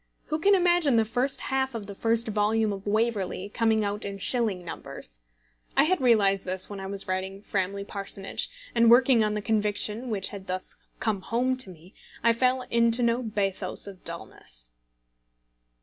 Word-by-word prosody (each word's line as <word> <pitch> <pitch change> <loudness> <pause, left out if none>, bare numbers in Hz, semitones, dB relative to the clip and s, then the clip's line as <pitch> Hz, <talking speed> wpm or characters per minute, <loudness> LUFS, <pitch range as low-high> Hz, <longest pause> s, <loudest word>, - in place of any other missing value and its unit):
Who 310 - 0
can 395 +5 +5
imagine 350 -7 +3
the 225 -1 +4
first 245 +5 -1
half 265 -1 -1
of 220 -3 -5
the 200 - -8
first 230 +3 0
volume 215 0 +1
of 195 +1 -8
Waverley 205 -3 -1
coming 220 -1 +1
out 205 +1 -3
in 200 0 -5
shilling 200 -4 -1
numbers? - - -8 0.6
I - - +7
had 345 0 +1
realised 200 -6 +4
this 185 0 -1
when 200 - -6
I 190 - -5
was 195 0 -1
writing 190 +1 -3
Framley 200 -1 -2
Parsonage; 195 -1 -1 0.2
and 230 -1 +5
working 245 -1 +6
on 210 0 0
the 210 - -3
conviction 215 +2 0
which 195 -4 0
had 195 -1 -9
thus 185 0 -3 0.2
come 215 -4 0
home 250 +5 0
to 255 -7 -1
me, 180 +1 -14 0.3
I 230 0 +5
fell 255 +2 +1
into 235 +1 +3
no 235 +1 +2
bathos 200 -4 -1
of 195 -2 -9
dulness. - - -4
215 Hz, 175 wpm, -27 LUFS, 195-235 Hz, 0.6 s, I